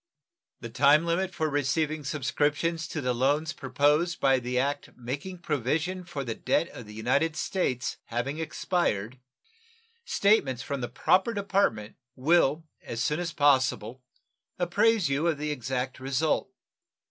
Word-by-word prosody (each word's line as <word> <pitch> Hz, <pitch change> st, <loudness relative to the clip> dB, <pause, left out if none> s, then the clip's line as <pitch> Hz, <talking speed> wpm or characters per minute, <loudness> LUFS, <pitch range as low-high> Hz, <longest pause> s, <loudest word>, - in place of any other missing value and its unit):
The 115 Hz, -, -6 dB
time 145 Hz, +6 st, +5 dB
limited 180 Hz, +3 st, -1 dB
for 160 Hz, -2 st, 0 dB
receiving 150 Hz, +2 st, 0 dB
subscriptions 150 Hz, +3 st, -1 dB
to 155 Hz, -, -4 dB
the 125 Hz, -1 st, 0 dB
loans 145 Hz, +6 st, +1 dB
proposed 145 Hz, +6 st, +1 dB
by 135 Hz, -1 st, +4 dB
the 125 Hz, +1 st, -3 dB
act 140 Hz, +3 st, -1 dB
making 145 Hz, +9 st, -6 dB
provision 155 Hz, +6 st, -1 dB
for 145 Hz, -5 st, -5 dB
the 115 Hz, -3 st, -3 dB
debt 165 Hz, -, 0 dB
of 120 Hz, -, -10 dB
the 105 Hz, -, -10 dB
United 140 Hz, +8 st, +1 dB
States 130 Hz, -12 st, -1 dB
having 125 Hz, +6 st, -3 dB
expired, 130 Hz, -, -1 dB, 0.8 s
statements 200 Hz, -, +2 dB
from 140 Hz, -2 st, -4 dB
the 120 Hz, -, -3 dB
proper 190 Hz, +5 st, +2 dB
department 195 Hz, -, 0 dB, 0.2 s
will 155 Hz, +2 st, +2 dB, 0.2 s
as 115 Hz, -, -6 dB
soon 150 Hz, +3 st, 0 dB
as 175 Hz, -1 st, -2 dB
possible 130 Hz, -5 st, +2 dB, 0.6 s
apprise 205 Hz, +3 st, +2 dB
you 140 Hz, +4 st, 0 dB
of 165 Hz, -3 st, +1 dB
the 150 Hz, +1 st, -2 dB
exact 130 Hz, -1 st, -3 dB
result. 135 Hz, +4 st, 0 dB
145 Hz, 140 wpm, -28 LUFS, 130-170 Hz, 0.8 s, time